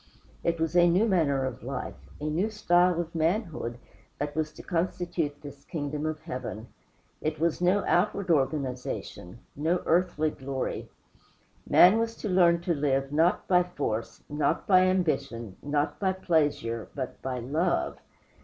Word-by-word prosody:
It 170 -1 0
was 165 +1 -1
a 175 0 +6
new 190 +7 +3
manner 145 -9 +2
of 130 -2 -5
life, 130 +2 -4 0.3
a - - -9
new 160 +8 0
style 180 -5 +3
of 170 -1 -4
manhood, 165 - -1 0.4
that 145 0 -3
was 155 -1 -1
to - - -11
constitute 170 -4 -2
this 140 -1 -10
kingdom 150 -2 -3
of 155 0 -4
Heaven. 125 -8 -6 0.5
It 155 0 -2
was 165 +1 0
no 185 +3 +3
outward 185 0 +1
organization 130 - -2
no 165 +5 0
earthly 160 -3 +2
glory. 135 -2 -4 0.8
Man 190 +5 +7
was 230 0 -1
to 215 - -5
learn 170 -2 +4
to 175 0 0
live, 135 -2 0
not 165 +6 +2
by 180 -1 +5
force, 145 -11 -4
not 150 +1 0
by 185 -2 +5
ambition, 135 - -1
not 145 +1 -1
by 190 -2 +1
pleasure, 150 -11 0
but 130 -3 -5
by 130 -1 -3
LOVE. 155 +9 -1
155 Hz, 150 wpm, -28 LUFS, 140-180 Hz, 0.8 s, Man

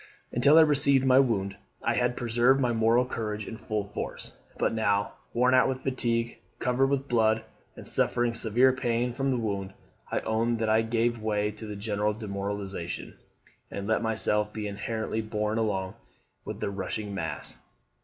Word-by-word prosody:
Until 140 +6 +5
I - - +10
received 140 -3 +5
my 130 0 +6
wound 100 -7 +1 0.3
I - - +2
had 125 0 0
preserved 120 +3 +3
my 125 -3 +1
moral 115 +2 +3
courage 105 -4 -4
in - - -6
full 110 -2 -2
force; 100 +1 -6 0.2
but - - +1
now, 105 -1 +1 0.2
worn 125 +2 +3
out 130 - +5
with 130 0 -3
fatigue, 120 -3 -1 0.2
covered 130 +2 +2
with 140 0 -1
blood, 110 -2 +2 0.3
and - - -10
suffering 120 -1 +1
severe 120 +3 +3
pain 120 -1 0
from 135 +2 -1
the 130 - +1
wound, 100 -4 -3 0.4
I - - 0
own 115 +1 0
that 110 -1 0
I 110 +1 +4
gave 115 +1 0
way 105 -1 0
to 105 +1 -8
the 105 - -5
general 105 0 -1
demoralisation, 100 -4 -4 0.6
and 100 - -5
let 110 +2 +1
myself 105 -2 0
be 105 0 -5
inertly 110 +2 -3
borne 110 0 -1
along 95 -4 -1 0.5
with - - -6
the - - -1
rushing 100 +2 -4
mass. 80 -6 -4
110 Hz, 170 wpm, -28 LUFS, 105-120 Hz, 0.6 s, I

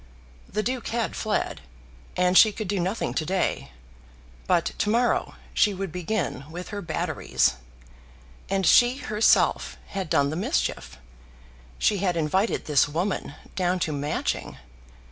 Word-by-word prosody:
The 215 +2 -1
Duke 250 0 -2
had 230 -1 -2
fled, 215 -1 -2 0.6
and 180 0 +3
she 215 +3 +8
could 210 0 -5
do 200 0 -1
nothing 190 +6 -1
to - - -1
day; 185 - -1 0.8
but - - +3
to 205 - +1
morrow 235 +3 +1 0.2
she 205 -2 +3
would 190 -2 -4
begin 175 -6 -2
with 175 +3 -7
her 205 -1 -5
batteries. 160 - 0 0.9
And 195 -1 0
she 245 +2 +5
herself 215 -5 +2
had 195 -4 -4
done 140 -1 +2
the - - -3
mischief! 180 - -2 0.8
She 205 - +2
had 180 -3 0
invited 185 +7 0
this 145 -3 +3
woman 170 -1 -2 0.2
down 180 0 +1
to 160 - 0
Matching! 145 +1 -2
190 Hz, 140 wpm, -25 LUFS, 165-210 Hz, 0.9 s, she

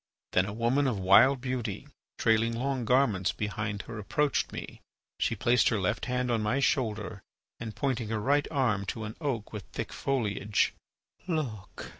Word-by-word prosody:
Then 90 +1 +3
a 100 - -4
woman 120 +5 +2
of 120 -5 0
wild 110 +8 +6
beauty, 125 -2 -3 0.3
trailing 115 0 +3
long 130 -1 -1
garments 110 -7 +3
behind 105 -1 -3
her, 115 - -7
approached 145 +7 0
me. - - -7 0.4
She - - +1
placed 120 +1 +3
her 115 - 0
left 100 +3 -1
hand 125 -1 0
on 115 -2 +1
my 105 +6 +1
shoulder, 105 -8 0 0.4
and, 110 -3 -6
pointing 125 -4 -1
her 110 -1 -1
right 145 +7 +2
arm 115 -9 +1
to 110 +3 -3
an 110 0 -6
oak 125 -9 -2
with 105 - -4
thick - - -4
foliage: 105 -6 0 0.5
"Look!" 135 - -4
115 Hz, 165 wpm, -29 LUFS, 105-130 Hz, 0.5 s, wild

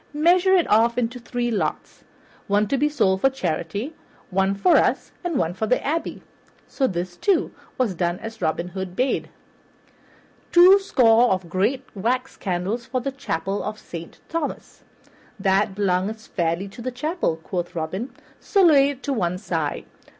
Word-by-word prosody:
Measure 355 +5 +4
it 355 - +3
off 230 +3 +3
into 245 0 -1
three 240 0 -2
lots, 215 - -3 0.4
one 205 +1 +2
to 275 - 0
be 295 +2 +2
sold 190 -10 +1
for 270 - +5
charity, 200 - -3 0.4
one 195 +1 +1
for 345 - +4
us, - - +1
and 345 -5 -1
one 165 -4 0
for 220 +4 -2
the 250 - +2
abbey." 320 +4 -2 0.4
So 270 - 0
this, 175 -2 -4
too, 390 - +1 0.3
was 245 -7 +1
done 175 0 -1
as 225 0 -9
Robin 170 +1 -1
Hood 190 0 -6
bade. 255 +4 0 1.2
"Twoscore 345 - +6
of 185 -2 -1
great 230 +9 0
wax 250 +6 -1
candles 195 +7 -3
for 255 0 -1
the 275 +3 -3
Chapel 200 -7 -3
of 215 +1 -4
Saint 170 -5 -10
Thomas." 330 -2 -5 0.6
"That 195 +1 +2
belongeth 200 +2 -1
fairly 170 +2 -1
to 195 - -11
the 255 - -2
chapel," 300 - -1
quoth 175 +2 -5
Robin, 185 +10 -3 0.3
"so 395 -2 +2
lay 285 -5 +6
it 275 -2 -7
to 285 - -1
one 180 -6 -1
side. 165 -6 -3
220 Hz, 160 wpm, -23 LUFS, 185-270 Hz, 1.2 s, Twoscore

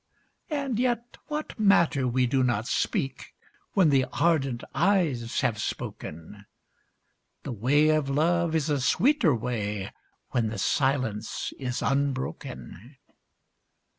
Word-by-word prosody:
And 275 -6 -2
yet 240 -1 -1
what 300 -5 -5
matter 170 -10 +4
we 125 +1 +2
do 130 +1 +1
not 120 -2 0
speak, 150 - -2 0.4
when 185 -5 +4
the 135 -2 +3
ardent 135 -4 +1
eyes 150 - +1
have 110 -3 0
spoken, 90 +5 -6 1.0
The 140 - -5
way 135 +7 +3
of 155 -3 +2
love 165 +3 +1
is 155 -1 0
a 145 -2 +1
sweeter 225 - +3
way, 105 -4 -3 0.4
when 120 -3 +1
the 110 0 -4
silence 130 -2 -1
is 125 -1 -3
unbroken. 130 - -3
135 Hz, 115 wpm, -27 LUFS, 120-170 Hz, 1.0 s, matter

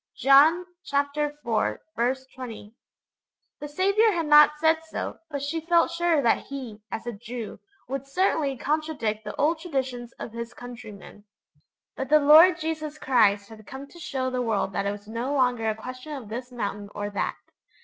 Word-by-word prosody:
_' - - -20
(John 300 +6 +6 0.3
iv. 285 +1 +1 1.0
20.) 225 -4 -9 0.9
The 295 - -6
Saviour 395 +8 +3
had 335 -2 -1
not 300 0 +7
said 320 +1 +2
so, 320 - -5
but 280 -2 -4
she 320 +3 -2
felt 335 +1 +3
sure 335 -4 +1
that 230 - +2
He, 250 -6 -7
as 225 - -5
a 240 - -4
Jew, 230 +1 -7 0.3
would 275 +1 -4
certainly 290 -4 +1
contradict 285 -8 -2
the 210 - -5
old 315 +3 +1
traditions 260 -7 -3
of - - -8
his 235 +1 -7
countrymen. 220 -4 -11 0.7
But 265 - -4
the 305 - +7
Lord 315 +4 +7
Jesus 310 -1 -4
Christ 205 -7 +2
had 215 -1 -13
come 265 +2 -8
to 345 - -14
show 260 -5 -3
the 250 0 -1
world 215 -4 -1
that 200 - -1
it - - +1
was 205 0 -9
no 235 +6 -3
longer 245 -4 +2
a 215 - -1
question 255 +6 -8
of 255 -7 -7
this 245 +3 -6
mountain 205 -4 -4
or 205 0 -4
that. 200 - -2
265 Hz, 170 wpm, -26 LUFS, 230-305 Hz, 1.0 s, not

